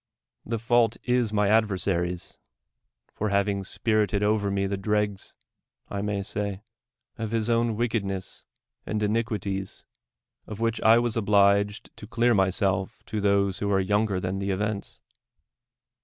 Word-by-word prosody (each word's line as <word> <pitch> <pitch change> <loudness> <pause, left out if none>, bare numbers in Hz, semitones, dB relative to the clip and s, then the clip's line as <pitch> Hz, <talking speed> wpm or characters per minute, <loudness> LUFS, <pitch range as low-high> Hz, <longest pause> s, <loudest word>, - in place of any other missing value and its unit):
The 115 +1 -2
fault 115 0 +2
is 125 -3 +1
my 105 -1 +2
adversary's, 95 -5 0 0.8
for 105 - -2
having 100 0 +1
spirited 105 0 0
over 105 -1 +1
me 100 0 0
the 100 +1 -1
dregs, 105 0 -2 0.5
I 100 - -3
may 100 -1 -2
say, 100 0 -4 0.6
of 110 -1 -2
his 115 +1 0
own 115 -1 +1
wickedness 100 -5 -3 0.4
and 105 -1 -2
iniquities, 105 -3 -2 0.6
of 105 -1 -7
which 115 0 0
I 110 +1 +6
was 120 -1 +1
obliged 100 -1 +2
to 105 - -10
clear 120 +2 +2
myself 95 +1 0
to 110 -2 -3
those 100 -1 +2
who 100 0 -1
are 95 - +3
younger 105 0 +1
than 90 +1 -3
the 100 0 -2
events. 100 +1 -3
105 Hz, 140 wpm, -26 LUFS, 100-110 Hz, 0.8 s, I